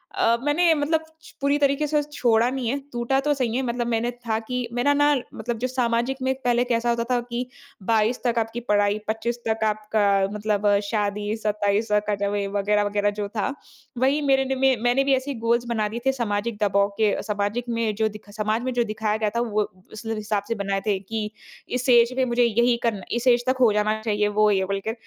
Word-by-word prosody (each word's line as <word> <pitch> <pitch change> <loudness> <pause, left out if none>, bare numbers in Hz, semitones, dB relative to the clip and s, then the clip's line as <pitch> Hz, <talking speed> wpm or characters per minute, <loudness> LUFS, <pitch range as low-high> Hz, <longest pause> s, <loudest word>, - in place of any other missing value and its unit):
अ, 230 +1 +3
मैंने 325 +4 +3
मतलब 315 +2 0 0.2
छ 315 - -14
पूरी 280 +1 +2
तरीके 280 +1 +2
से 300 0 +2
छोड़ा 240 -5 +2
नहीं 260 -2 -3
है, 275 - 0 0.2
टूटा 240 +3 +1
तो 295 - +4
सही 250 -5 -1
है। 260 - +1
मतलब 240 -1 -2
मैंने 235 +1 0
था 235 -2 -3
कि 250 +2 -4
मेरा 245 +4 +2
ना 290 +1 +4 0.2
मतलब 240 -1 -3
जो 255 - 0
सामाजिक 245 0 0
में 260 0 +1
पहले 245 0 +2
कैसा 240 -1 0
होता 235 0 +1
था 245 - +3
कि 240 +1 -2 0.4
22 225 +2 +2
तक 235 -1 +2
आपकी 225 +1 -3
पढ़ाई, 205 0 +2
25 225 +2 -2
तक 220 0 0
आपका 215 0 0 0.3
मतलब 210 -1 0 0.2
शादी, 210 -1 -1
27 210 0 0 0.2
कट 200 -1 -1
वे 205 -1 -1
वग़ैरह-वग़ैरह 205 +1 +1
जो 205 - -2
था। 215 +7 0 0.4
वही 270 +4 +2
मेरे 270 0 +4
ने 265 0 -1
में 265 0 +3
मैंने 245 +3 +3
भी 275 0 +2
ऐसे 265 +2 0
ही 270 - -5
गोल्स 235 +1 +1
बना 220 -3 0
दिए 235 - -4
थे। 265 - +4
सामाजिक 230 -3 -2
दबाव 200 0 +2
के 215 -2 +3
अ, - - -2
सामाजिक 210 +3 -2
में 230 -2 0
जो 220 +1 +1
दिखा 215 -1 -12
समाज 215 +2 0
में 255 0 -2
जो 240 0 +2
दिखाया 215 -1 -2
गया 215 -1 0
था - - +2
वो, 215 -3 0 0.3
उस 220 +1 -9
हिसाब 215 -2 -2
से 230 - 0
बनाए 195 -1 -2
थे 200 -2 +1
कि 210 +2 -4 0.4
इस 250 +1 -2
एज 240 -1 +6
में 260 - +3
मुझे 240 0 +2
यही 235 +1 +3
करना 225 -5 0
इस 240 +1 -2
एज 245 -1 +4
तक 260 +1 +2
हो 235 -3 +6
जाना 210 +1 +1
चाहिए 210 -2 0
वो, 210 +1 +3
ये 190 -1 +1
बोल 195 +1 -2
के। - - +1
230 Hz, 225 wpm, -24 LUFS, 210-250 Hz, 0.4 s, एज